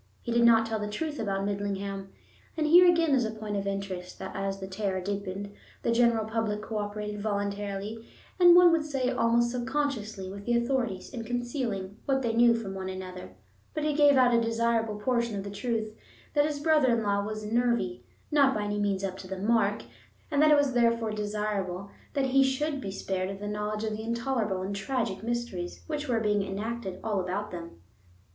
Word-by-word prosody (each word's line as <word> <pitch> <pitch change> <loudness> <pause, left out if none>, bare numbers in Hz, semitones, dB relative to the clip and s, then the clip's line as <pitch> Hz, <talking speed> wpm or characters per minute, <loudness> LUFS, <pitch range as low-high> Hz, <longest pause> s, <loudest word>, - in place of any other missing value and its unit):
He 235 - -3
did 235 0 +3
not 225 -1 +6
tell 225 -1 -2
the 210 - -3
truth 295 +7 -3
about 195 -2 -1
Midlingham—and 200 +7 -5
here 350 +3 +8
again 335 -3 +3
is 260 -2 +4
a 220 - -1
point 215 -1 -5
of 200 0 -2
interest, 195 -2 -4
that - - -7
as 195 0 -2
the 190 - -5
terror 190 0 -2
deepened 200 +1 -4 0.3
the - - +1
general 230 -2 +3
public 220 -1 -2
cooperated 210 -1 -4
voluntarily, 205 +1 -3 0.4
and, 350 -1 +8
one 355 -1 +8
would 330 -2 +2
say, 270 -4 -1
almost 235 -1 +2
subconsciously, 245 -6 -2
with 200 +2 -8
the 240 0 +3
authorities 235 -6 -1
in 240 -3 -5
concealing 240 -5 -3
what 270 -1 +1
they 230 -2 0
knew 235 0 +5
from 215 -4 -4
one 190 -1 -4
another—but 185 - -8
he 305 0 +1
gave 290 -1 +6
out 250 -1 +5
a 235 - +4
desirable 230 -2 0
portion 235 -1 0
of 195 - -3
the 200 - -6
truth: 220 0 -2 0.4
that 290 0 +3
his 295 -2 -3
brother 305 -2 +3
in 225 - -1
law 200 -1 +1
was 215 +1 -5
"nervy," 225 - 0 0.3
not 280 -3 +4
by 210 - -1
any 205 0 -2
means 200 -2 0
up 190 -1 -3
to 190 - -9
the 190 0 -5
mark, 210 0 +1 0.5
and 290 -1 +3
that 305 - +6
it 300 - +7
was 285 -2 +2
therefore 230 -2 +2
desirable 205 -3 -3 0.2
that 275 -1 +2
he 270 +1 +4
should 275 +2 -1
be 200 - -4
spared 190 0 -3
the 205 - -5
knowledge 210 +1 -3
of 220 - -1
the 215 - -6
intolerable 230 -4 -1
and 200 +1 -3
tragic 200 -2 -2
mysteries 230 -6 -4
which 300 -1 -3
were 235 -2 +2
being 210 -2 +1
enacted 195 0 -4
all 215 -3 0
about 190 +3 -3
them. 170 - -8
215 Hz, 195 wpm, -28 LUFS, 200-245 Hz, 0.5 s, here